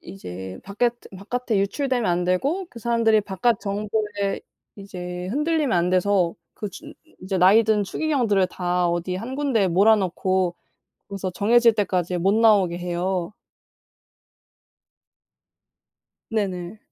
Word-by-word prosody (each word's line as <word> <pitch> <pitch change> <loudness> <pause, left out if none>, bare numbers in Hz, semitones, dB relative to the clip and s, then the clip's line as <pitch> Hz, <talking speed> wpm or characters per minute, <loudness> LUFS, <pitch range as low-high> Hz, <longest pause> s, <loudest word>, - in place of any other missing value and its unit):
이제 95 0 -8
바꺁에 205 +5 +1 0.3
바깥에 230 +2 -2
유출되면 245 +2 0
안 175 +1 0
되고 280 - 0
그 235 - -11
사람들이 230 -2 +2
바깥 205 +3 0
정보에 205 0 -2 0.4
이제 180 -3 -7
흔들리면 295 - 0
안 175 +1 +1
돼서 185 -1 +2 0.2
그 210 - -6
준 300 - -11 0.3
이제 190 +1 -3
나이 195 +5 +6
든 215 -1 +2
추기경들을 225 -5 +1
다 180 -1 -1
어디 175 +1 -2
1 235 +7 -6
군데에 265 -9 +1
몰아 200 +6 +5
넣고 185 -2 0 0.5
거기서 195 -2 -4
정해질 230 +4 +4
때까지 185 -4 -1
못 195 +3 +2
나오게 205 -6 +4
해요. 180 +1 -2 3.0
네네. 195 -3 -3
200 Hz, 260 characters per minute, -23 LUFS, 180-225 Hz, 3.0 s, 나이